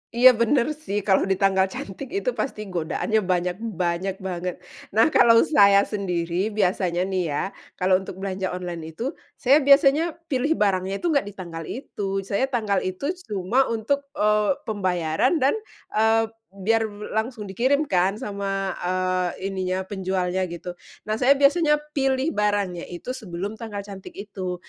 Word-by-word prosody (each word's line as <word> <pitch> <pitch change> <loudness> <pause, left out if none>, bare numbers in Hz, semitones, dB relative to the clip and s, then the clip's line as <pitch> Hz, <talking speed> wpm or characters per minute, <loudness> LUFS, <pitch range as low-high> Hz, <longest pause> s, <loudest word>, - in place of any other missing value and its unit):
Iya 255 +2 +9
bener 235 +4 +2
sih 290 -10 -4
kalau 195 -1 +3
di 190 - +2
tanggal 190 0 +3
cantik 195 +6 -7
itu 450 +5 0
pasti 240 - -3
godaannya 175 +5 0
banyak 180 0 0
banyak 185 -3 -2
banget. 180 -1 -3 0.4
Nah 225 +8 +5
kalau 230 -3 +6
saya 200 -7 +5
sendiri 180 -2 -1
biasanya 185 -3 0
nih 190 -1 -1
ya, 145 - -1 0.3
kalau 185 0 +3
untuk 190 - -8
belanja 190 -1 -3
online 170 -3 -6
itu 250 - -2 0.2
saya 275 +3 +4
biasanya 285 +3 +4 0.2
pilih 275 +5 +1
barangnya 195 -3 0
itu 345 - +2
nggak 280 -9 +1
di 205 - -7
tanggal 170 -4 -7
itu, 195 -6 -4
saya 200 +7 0
tanggal 220 -7 0
itu 185 - -2 0.2
cuma 210 +7 +1
untuk, 275 +6 -1
eee, 210 +3 +2
pembayaran 185 - 0
dan, 270 - +4 0.4
eee, 225 +1 +3 0.2
biar 220 +4 0
be 205 0 -9
langsung 220 0 -2
dikirim 255 +9 +1
kan 190 -6 +1
sama, 195 -2 -3
eee, 185 +1 -1
ininya, 185 0 -2
penjualnya 190 -1 -1
gitu. 175 +1 -6 0.3
Nah 215 +1 -2
saya 265 +2 +5
biasanya 300 +2 +4 0.2
pilih 270 +2 +1
barangnya 205 -4 -1
itu 175 +8 -6
sebelum 205 -5 -5
tanggal 210 -3 -5
cantik 195 -1 -10
itu. 195 -3 -5
200 Hz, 155 wpm, -24 LUFS, 185-235 Hz, 0.4 s, Iya